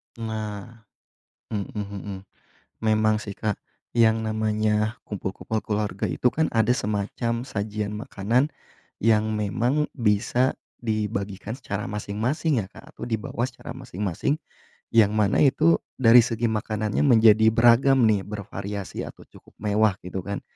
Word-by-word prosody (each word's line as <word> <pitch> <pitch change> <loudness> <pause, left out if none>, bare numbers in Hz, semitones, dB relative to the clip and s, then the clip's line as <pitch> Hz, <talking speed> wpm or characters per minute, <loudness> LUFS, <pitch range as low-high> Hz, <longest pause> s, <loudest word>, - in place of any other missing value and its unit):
Nah, 110 0 -6 0.7
mhm 100 -2 -2
mhm. 100 -1 -5 0.6
Memang 110 -1 +3
sih, 100 -2 -7
Kak, 110 -2 -1 0.4
yang 115 -1 +4
namanya 110 0 0
kumpul-kumpul 105 +2 -4
keluarga 105 -1 -2
itu 125 - +2
kan 160 0 +1
ada 115 +1 +3
semacam 115 +2 -2
sajian 105 -3 -3
makanan 120 +3 0 0.6
yang 110 -1 +3
memang 120 +8 0
bisa 120 +2 +2 0.2
dibagikan 105 -2 -3
secara 105 -7 -4
masing-masing, 110 - -1
ya, - - -10
Kak, - - -15
atau - - -8
dibawa 115 0 -2
secara 125 - -10
masing-masing. 100 - -2 0.5
Yang 110 -2 +5
mana 105 -2 +2
itu 155 +4 +4 0.2
dari 120 -2 +7
segi 115 0 0
makanannya, 110 -1 -1
menjadi 110 -3 +6
beragam 120 +3 +5
nih, 110 -3 +4
bervariasi, 100 -1 -5
atau - - -11
cukup - - -19
mewah 105 -1 +3
gitu 90 +1 -5
kan, 100 +2 -5
110 Hz, 125 wpm, -25 LUFS, 105-115 Hz, 0.7 s, dari